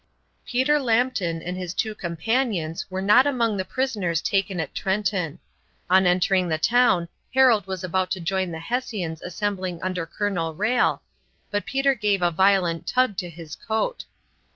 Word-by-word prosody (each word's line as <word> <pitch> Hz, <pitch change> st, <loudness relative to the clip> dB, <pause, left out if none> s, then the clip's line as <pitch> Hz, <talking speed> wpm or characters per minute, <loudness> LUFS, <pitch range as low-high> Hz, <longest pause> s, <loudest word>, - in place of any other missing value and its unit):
Peter 260 Hz, +4 st, +2 dB
Lambton 225 Hz, -, 0 dB
and 180 Hz, +1 st, -4 dB
his 180 Hz, -1 st, -5 dB
two 220 Hz, -2 st, -1 dB
companions 175 Hz, -1 st, -2 dB
were 190 Hz, 0 st, -3 dB
not 240 Hz, +7 st, +6 dB
among 235 Hz, -6 st, +1 dB
the 190 Hz, -, -1 dB
prisoners 205 Hz, -9 st, -1 dB
taken 195 Hz, 0 st, 0 dB
at 160 Hz, -, -4 dB
Trenton. 190 Hz, -5 st, -1 dB, 0.5 s
On 190 Hz, 0 st, +5 dB
entering 180 Hz, +1 st, +2 dB
the 160 Hz, -, +1 dB
town 185 Hz, -1 st, +3 dB, 0.3 s
Harold 245 Hz, -7 st, +5 dB
was 190 Hz, -1 st, -4 dB
about 185 Hz, +1 st, 0 dB
to 190 Hz, -, -2 dB
join 185 Hz, +2 st, -1 dB
the 165 Hz, -, -5 dB
Hessians 180 Hz, -4 st, -3 dB
assembling 185 Hz, -1 st, -3 dB
under 180 Hz, -3 st, -2 dB
Colonel 175 Hz, -4 st, -2 dB
Rhalle, 225 Hz, +7 st, +1 dB, 0.5 s
but 205 Hz, 0 st, -2 dB
Peter 270 Hz, 0 st, +2 dB
gave 205 Hz, -6 st, 0 dB
a 175 Hz, -, +3 dB
violent 180 Hz, -1 st, +2 dB
tug 255 Hz, -4 st, +2 dB
to 180 Hz, -, -3 dB
his 165 Hz, -2 st, -9 dB
coat. 225 Hz, -, -2 dB
190 Hz, 155 wpm, -24 LUFS, 175-225 Hz, 0.5 s, not